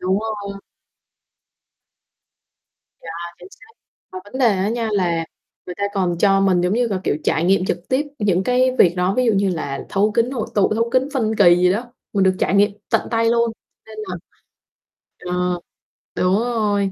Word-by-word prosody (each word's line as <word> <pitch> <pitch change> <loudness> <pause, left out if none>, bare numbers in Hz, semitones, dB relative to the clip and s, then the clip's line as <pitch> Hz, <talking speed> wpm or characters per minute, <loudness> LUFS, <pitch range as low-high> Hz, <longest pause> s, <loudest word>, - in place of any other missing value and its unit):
Đúng 190 +2 +1
rồi. 205 -3 -5 2.4
Yeah, 170 +1 -8
chính 180 +1 -13
xác, 445 - -19 0.4
mà 185 - -5
vấn 230 +6 -8
đề 255 - +4
á 190 +2 0
nha 230 0 -2
là 170 -4 0 0.4
người 180 - -6
ta 200 - -2
còn 180 -3 0
cho 195 +1 +3
mình, 190 -2 +3
giống 180 +1 0
như 235 +1 +1
gà, 195 -3 -1
kiểu, - - +1
trải 160 - +1
nghiệm 190 +1 +3
trực 180 -1 -3
tiếp 275 +3 0
những 190 -4 +1
cái 255 +2 +3
việc 175 -1 +5
đó. 180 +2 +1
Ví 255 - +2
dụ 230 - +4
như 195 -1 +1
là 140 -5 -4
thấu 205 +2 +1
kính 235 +2 +1
hội 235 -5 -3
tụ, 205 0 +2
thấu 230 +1 0
kính 260 +2 +1
phân 220 -4 0
kỳ 175 -4 +6
gì 180 0 +3
đó, 240 +4 -4 0.2
mình 200 - +1
được 185 0 +3
trải - - 0
nghiệm 200 +1 +4 0.2
tận - - +1
tay 230 0 +1
luôn, 235 -1 +1 0.3
nên 220 -1 -12
là 180 - -4 1.2
ờ, 180 -1 -1 0.6
đúng 185 +1 +2
rồi, 210 -5 0
200 Hz, 190 wpm, -20 LUFS, 180-230 Hz, 2.4 s, kỳ